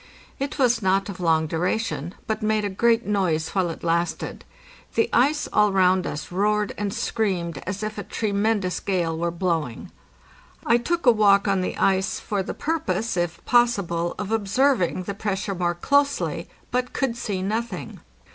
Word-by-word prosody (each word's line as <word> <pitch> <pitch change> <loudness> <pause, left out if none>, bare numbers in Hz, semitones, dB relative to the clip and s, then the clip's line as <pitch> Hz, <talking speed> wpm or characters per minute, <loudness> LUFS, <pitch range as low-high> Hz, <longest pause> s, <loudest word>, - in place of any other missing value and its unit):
It 275 +2 -3
was 245 -4 +3
not 195 +1 +1
of 190 - -7
long 160 -2 +2
duration, 175 +1 -2
but 220 0 -2
made 215 -1 +1
a 200 - -2
great 230 +4 +2
noise 180 -6 0
while 185 -3 0
it 165 - -7
lasted; 170 +1 -1 0.5
the 225 - +3
ice 290 +5 +3
all 210 -1 +4
round 185 -1 +3
us 150 +4 -5
roared 210 +2 +1
and 205 -1 -2
screamed 180 -9 -1
as 195 +3 -3
if 215 0 -4
a - - -4
tremendous 205 -3 0
gale 175 -4 -1
were 170 +1 -1
blowing. 165 -7 -2 0.7
I 235 - +5
took 340 +7 -2
a 245 - +8
walk 205 -2 +4
on 195 -1 +2
the 185 - -3
ice 190 0 +1
for 205 -2 -2
the 190 - -5
purpose, 230 - -1
if 175 -1 -2
possible, 200 -9 +2
of 205 0 -4
observing 215 -3 +1
the 200 - -4
pressure 200 -1 -2
more 175 -1 -1
closely, 285 +9 +1 0.2
but 250 0 -1
could 265 -4 -1
see 200 -5 -3
nothing. 215 -1 -3
200 Hz, 165 wpm, -24 LUFS, 180-225 Hz, 0.7 s, a